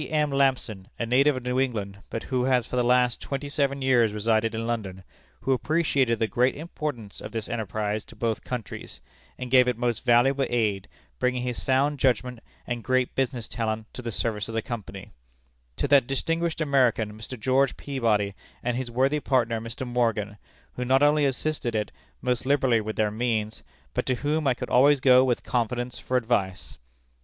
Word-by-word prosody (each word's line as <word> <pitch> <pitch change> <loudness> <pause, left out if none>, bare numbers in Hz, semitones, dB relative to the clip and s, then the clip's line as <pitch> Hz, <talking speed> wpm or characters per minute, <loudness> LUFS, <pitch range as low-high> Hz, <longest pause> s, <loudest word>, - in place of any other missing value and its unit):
M. 150 -2 +1
Lampson, 130 -8 0
a 120 - -2
native 135 +4 +3
of 130 - -6
New 125 +1 0
England, 105 -7 -2
but 115 - -4
who 125 -2 -1
has 125 -3 +2
for - - -6
the 125 - +2
last 125 0 +2
twenty 140 +1 -4
seven 140 -1 -1
years 120 -5 +3
resided 110 +1 +1
in 115 0 -3
London, 100 -5 -4 0.4
who 135 - +1
appreciated 135 -2 +1
the 110 - +1
great 125 +3 +1
importance 145 - -6
of - - -7
this 115 -2 -4
enterprise 110 -1 -2
to - - -15
both 110 0 -2
countries, 125 -5 -6 0.4
and 125 -1 -6
gave 130 -1 +6
it 125 -2 0
most 120 -2 -1
valuable 130 +3 +3
aid, 105 -5 0 0.3
bringing 125 0 0
his 125 -1 -3
sound 140 +2 +1
judgment 125 -1 +1 0.3
and 120 -2 -4
great 130 0 +1
business 125 -3 -2
talent 110 -2 -3
to - - -7
the 115 -1 -4
service 105 -1 -2
of 115 - -5
the 115 - +1
Company; 100 -5 -7 0.6
to 145 - -1
that 140 -3 +5
distinguished 165 +4 -1
American, 125 -7 +2
Mr. 110 +3 -8
George 130 +3 +2
Peabody, 110 -7 0 0.3
and 125 0 0
his 130 -2 -3
worthy 135 +5 +1
partner, 120 -5 +1
Mr. 115 +3 -6
Morgan, 115 -4 0 0.4
who 125 - -4
not 130 +3 +3
only 145 0 +4
assisted 135 -3 -1
it 105 -1 -1 0.3
most 125 -1 0
liberally 130 -4 +2
with 110 +1 -5
their 105 -1 +1
means, 110 -1 -2 0.3
but - - -2
to 130 - +2
whom 150 +3 -1
I 125 - +3
could - - -6
always 140 +3 +5
go 130 -1 +6
with 125 -2 0
confidence 120 +1 -2
for 130 - 0
advice." 95 -6 -2
125 Hz, 185 wpm, -26 LUFS, 110-135 Hz, 0.6 s, gave